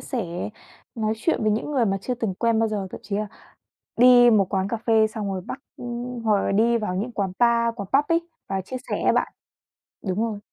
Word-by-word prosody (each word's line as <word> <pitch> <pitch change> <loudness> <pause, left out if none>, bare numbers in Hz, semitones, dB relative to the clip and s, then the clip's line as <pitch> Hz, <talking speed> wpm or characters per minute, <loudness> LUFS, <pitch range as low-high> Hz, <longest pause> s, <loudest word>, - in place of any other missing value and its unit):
sẻ, 185 -8 -4 0.5
nói 220 -1 0
chuyện 225 +2 0
với 215 - +2
những 225 +7 -2
người 255 -5 +2
mà 195 -1 +1
chưa 250 +5 -2
từng 225 -6 -2
quen 230 +1 +1
bao 225 0 +2
giờ, 205 -3 -3
thậm - - -8
chí 200 0 -3
là 210 0 -1 0.7
đi 245 0 +7
một 200 -4 +4
quán 190 +1 0
cà 230 - -1
phê 220 -1 +3
xong 210 -2 -4
rồi 185 - -3
bắt 270 - -5 0.2
ưm, 245 0 -5
hoặc 210 -2 +3
là - - 0
đi 230 +3 +3
vào 210 -4 -3
những 225 +6 -3
quán 195 -4 -2
Bar, 235 -1 +3
quán 200 -5 -7
Pub 285 +2 +4
ấy, 335 +1 +1 0.2
vào 195 0 -1
chia 255 +8 -6
sẻ - - -1
á - - +4
bạn. - - 0 0.7
Đúng 190 +3 -1
rồi. 220 -3 -2
220 Hz, 235 wpm, -24 LUFS, 200-240 Hz, 0.7 s, đi